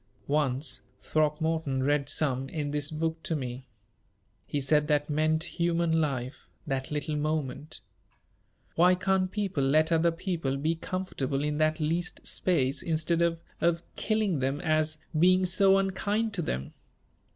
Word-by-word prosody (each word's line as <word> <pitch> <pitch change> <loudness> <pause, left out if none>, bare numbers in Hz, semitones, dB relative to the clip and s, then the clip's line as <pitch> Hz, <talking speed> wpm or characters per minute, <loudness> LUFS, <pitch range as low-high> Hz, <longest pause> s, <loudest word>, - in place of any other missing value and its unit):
"Once, 135 -2 0 0.2
Throckmorton 155 -2 0
read 145 0 +1
some 135 -3 +1
in 145 -2 -3
this 145 0 0
book 160 +1 -2
to 160 - -2
me. 130 -2 -5 0.8
He 145 - -1
said 150 +2 +2
that 150 0 +1
meant 155 +1 +2
human 170 -1 +1
life 130 -3 -3 0.2
that 135 -2 -2
little 150 +1 -2
moment. 150 0 -3 0.9
Why 180 +2 +5
can't 185 0 +1
people 195 -9 -1
let 155 +4 +3
other 165 +1 +4
people 165 -6 -2
be 155 +4 0
comfortable 160 -6 -3
in 150 0 -1
that 155 0 +2
least 165 +3 -2
space, 140 -6 +1
instead 165 +1 0
of 165 -1 +1 0.2
of 170 0 +2
killing 215 -7 0
them 135 +2 -1
as 155 0 +1 0.2
being 185 +2 +5
so 195 +2 +4
unkind 205 +3 0
to 190 - -1
them?" 65 - -3
155 Hz, 140 wpm, -28 LUFS, 145-170 Hz, 0.9 s, Why